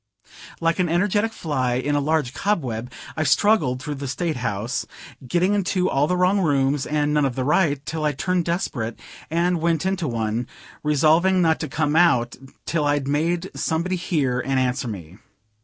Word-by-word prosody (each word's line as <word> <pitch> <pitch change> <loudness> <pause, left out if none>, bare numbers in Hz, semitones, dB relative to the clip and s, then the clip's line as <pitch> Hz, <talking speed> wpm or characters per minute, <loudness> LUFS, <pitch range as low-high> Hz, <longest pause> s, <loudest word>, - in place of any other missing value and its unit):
Like 165 +2 +1
an 180 -2 +2
energetic 205 +5 +1
fly 130 - -1
in 130 +4 -1
a - - +3
very 140 - -3
large 155 -5 0
cobweb, 125 - -2 0.2
I 155 - -2
struggled 155 -4 +3
through 150 +3 -4
the 140 - -3
State 160 +3 -2
House, 115 0 -2 0.4
getting 175 +8 +2
into 185 -2 0
all 140 +2 +2
the 180 - 0
wrong 185 +3 +3
rooms 140 -4 +1
and 150 0 0
none 150 -1 +3
of 135 -3 0
the 130 - -1
right, 145 -1 +1
till 160 -1 -3
I 150 - +2
turned 180 +4 -1
desperate, 140 -10 -2 0.3
and 170 +1 +1
went 165 0 +1
into 190 -4 -1
one, 115 0 -2 0.3
resolving 160 +5 +3
not 160 -2 +3
to 155 - -3
come 150 +1 0
out 125 -9 +3 0.3
till 155 -2 0
I'd 145 -2 +1
made 165 +5 0
somebody 170 +3 -1
hear 150 -8 0
and 135 -1 0
answer 125 0 0
me. 95 -4 -8
150 Hz, 180 wpm, -23 LUFS, 130-175 Hz, 0.4 s, a